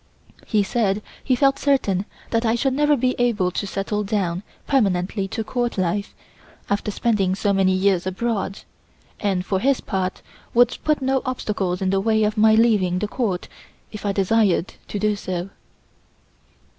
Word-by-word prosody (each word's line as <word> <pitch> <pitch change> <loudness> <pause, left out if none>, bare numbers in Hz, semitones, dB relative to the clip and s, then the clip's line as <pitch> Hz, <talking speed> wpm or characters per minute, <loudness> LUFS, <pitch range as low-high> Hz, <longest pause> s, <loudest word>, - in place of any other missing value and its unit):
He 210 -3 +2
said 205 -1 0 0.2
he 260 - +2
felt 275 +1 +3
certain 210 -10 +1 0.3
that 230 0 +1
I 225 0 +2
should 265 +2 +1
never 295 +1 +3
be 255 +1 +1
able 215 -7 +2
to 200 - -3
settle 205 +2 -2
down 190 -4 -1 0.2
permanently 195 -6 +1
to 225 +3 -3
Court 240 +1 -2
life 190 +3 -1 0.6
after 205 +1 0
spending 200 -3 +1
so 200 +1 +1
many 190 -1 +3
years 185 -1 +2
abroad, 195 0 -2 0.6
and 190 -3 0
for 190 -1 0
his 270 +5 +2
part 190 -1 -3 0.3
would 245 0 +5
put 305 -3 +1
no 265 0 +1
obstacles 195 -7 -2
in 190 - +1
the 195 0 +2
way 220 +1 +2
of 210 0 +1
my 220 0 +5
leaving 210 -6 +3
the 210 - -1
Court 205 -6 -2 0.4
if 210 - -8
I 205 - +1
desired 195 -2 +2
to - - -4
do 210 +1 +1
so. 185 -1 -4
210 Hz, 165 wpm, -22 LUFS, 190-235 Hz, 0.6 s, would